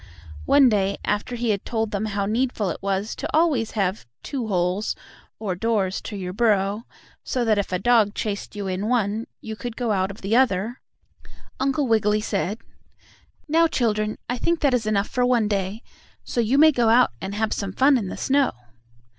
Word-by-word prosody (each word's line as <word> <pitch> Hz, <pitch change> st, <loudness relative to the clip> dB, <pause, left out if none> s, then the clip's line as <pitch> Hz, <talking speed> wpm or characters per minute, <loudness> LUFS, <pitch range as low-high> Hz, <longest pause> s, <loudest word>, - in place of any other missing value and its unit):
One 280 Hz, -2 st, +6 dB
day, 200 Hz, -3 st, +1 dB
after 210 Hz, +4 st, -1 dB
he 235 Hz, -1 st, 0 dB
had 200 Hz, -2 st, -2 dB
told 220 Hz, -2 st, -2 dB
them 205 Hz, +1 st, -2 dB
how 200 Hz, -1 st, -1 dB
needful 220 Hz, -3 st, 0 dB
it -, -, -7 dB
was 200 Hz, +2 st, -2 dB
to -, -, -4 dB
always 290 Hz, -10 st, +2 dB
have 190 Hz, -, -1 dB, 0.2 s
two 260 Hz, -6 st, -4 dB
holes, 185 Hz, +1 st, 0 dB, 0.4 s
or 205 Hz, -4 st, -3 dB
doors, 195 Hz, -1 st, 0 dB
to 210 Hz, -, -7 dB
your 185 Hz, -2 st, -5 dB
burrow, 210 Hz, 0 st, +1 dB, 0.4 s
so 250 Hz, -2 st, -1 dB
that 215 Hz, -2 st, +3 dB
if 200 Hz, -, -3 dB
a 180 Hz, -, +1 dB
dog 215 Hz, 0 st, +3 dB
chased 205 Hz, -1 st, -4 dB
you 205 Hz, -1 st, -4 dB
in 190 Hz, +2 st, -2 dB
one, 225 Hz, -2 st, 0 dB
you 220 Hz, -1 st, -6 dB
could 240 Hz, +1 st, -6 dB
go 240 Hz, -3 st, -1 dB
out 190 Hz, -1 st, +1 dB
of 200 Hz, -, -10 dB
the 200 Hz, +4 st, 0 dB
other, 235 Hz, -2 st, +1 dB, 0.8 s
Uncle 275 Hz, +2 st, +1 dB
Wiggily 215 Hz, -2 st, +2 dB
said: 205 Hz, -1 st, -2 dB, 0.9 s
"Now, 330 Hz, +2 st, +4 dB
children, 215 Hz, -7 st, 0 dB
I 245 Hz, 0 st, -2 dB
think 335 Hz, +4 st, 0 dB
that 280 Hz, -3 st, +3 dB
is 230 Hz, -4 st, 0 dB
enough 205 Hz, -1 st, +1 dB
for 250 Hz, -2 st, -1 dB
one 245 Hz, -3 st, +3 dB
day, 200 Hz, +2 st, -2 dB, 0.4 s
so 240 Hz, -, -1 dB
you 235 Hz, +5 st, +1 dB
may 315 Hz, +2 st, +7 dB
go 240 Hz, -5 st, +2 dB
out 240 Hz, -, +5 dB
and 195 Hz, +1 st, -4 dB
have 220 Hz, 0 st, 0 dB
some 200 Hz, -2 st, -3 dB
fun 270 Hz, +7 st, +4 dB
in 220 Hz, -6 st, -1 dB
the -, -, -6 dB
snow." 275 Hz, 0 st, +2 dB
215 Hz, 195 wpm, -23 LUFS, 200-245 Hz, 0.9 s, may